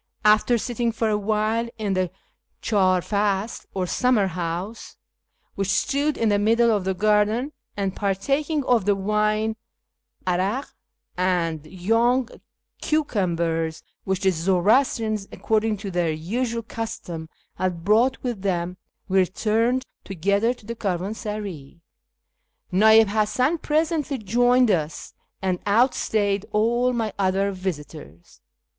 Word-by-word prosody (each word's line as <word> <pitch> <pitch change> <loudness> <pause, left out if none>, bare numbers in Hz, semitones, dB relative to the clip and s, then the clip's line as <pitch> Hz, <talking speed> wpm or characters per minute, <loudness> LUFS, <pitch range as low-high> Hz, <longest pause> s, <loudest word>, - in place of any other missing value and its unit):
After 215 +3 +5
sitting 235 0 -1
for 225 0 -1
a 210 - +2
while 215 +2 0
in 210 -3 -1
the 185 -1 0 0.5
clidr 185 -4 +2
fasl 205 +1 -1
or 185 -1 0
summer 245 +2 +2
house, 180 +4 -5 0.6
which 195 -1 -2
stood 285 +8 +1
in 225 - +2
the 205 -1 +2
middle 230 +3 +3
of 205 -4 0
the 190 0 0
garden, 215 +6 +2 0.3
and 195 -2 -2
partaking 275 - 0
of 240 -6 +2
the 205 -1 +3
wine, 215 +2 0 0.7
'arak, 190 +9 -1 0.4
and 170 -4 0
young 230 +8 +1 0.5
cucumbers 170 - -1 0.2
which 190 -1 -1
the 190 -1 +3
Zoroastrians, 205 - +1
according 220 -1 0
to 200 0 -6
their 175 -2 0
usual 230 +9 -2
custom, 175 -8 -6 0.3
had 180 -3 -2
brought 230 +6 +3
with 240 -6 -3
them, 180 -2 -2 0.3
we 190 +1 +3
returned 225 +7 +1 0.2
together 200 +5 +1
to 215 - -19
the 230 - -4
caravansaray. 200 -5 -4 0.9
Na'ib 220 +3 +7
Hasan 235 +9 +1
presently 305 -2 0
joined 245 +2 +3
us, 155 -4 -2 0.3
and 185 -2 0
outstayed 205 -3 +1
all 240 +4 +2
my 225 -4 -2
other 195 +1 +1
visitors. 150 - -7
210 Hz, 120 wpm, -24 LUFS, 185-230 Hz, 0.9 s, Na'ib